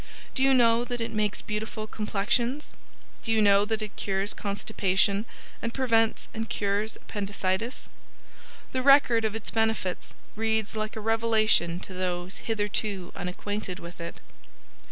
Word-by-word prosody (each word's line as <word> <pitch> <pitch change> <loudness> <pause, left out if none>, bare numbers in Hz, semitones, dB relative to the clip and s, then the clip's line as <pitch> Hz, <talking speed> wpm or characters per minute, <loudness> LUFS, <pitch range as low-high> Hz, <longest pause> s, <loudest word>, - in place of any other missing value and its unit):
Do 265 - -1
you 270 0 +5
know 235 -1 +5
that 245 0 -4
it 230 - -2
makes 210 -1 -1
beautiful 215 +1 -4
complexions? 235 +6 0 0.5
Do 225 - -1
you 220 - +4
know 200 -1 +5
it 215 -2 -2
cures 195 +1 0
constipation 200 0 +1 0.4
and 230 0 -3
prevents 225 -4 +2
and 225 0 -4
cures 205 +2 0
appendicitis? 200 +2 -3 0.8
The 260 - 0
record 255 -4 +6
of 220 0 -1
its 225 - -3
benefits 220 -5 -1 0.2
reads 220 0 0
like 215 0 -3
a 220 - -4
revelation 220 -6 +3
to 190 - -7
those 180 0 -2
hitherto 205 -3 -2
unacquainted 185 +1 -4
with 170 -1 -9
it. 170 - -6
215 Hz, 135 wpm, -27 LUFS, 200-225 Hz, 0.8 s, record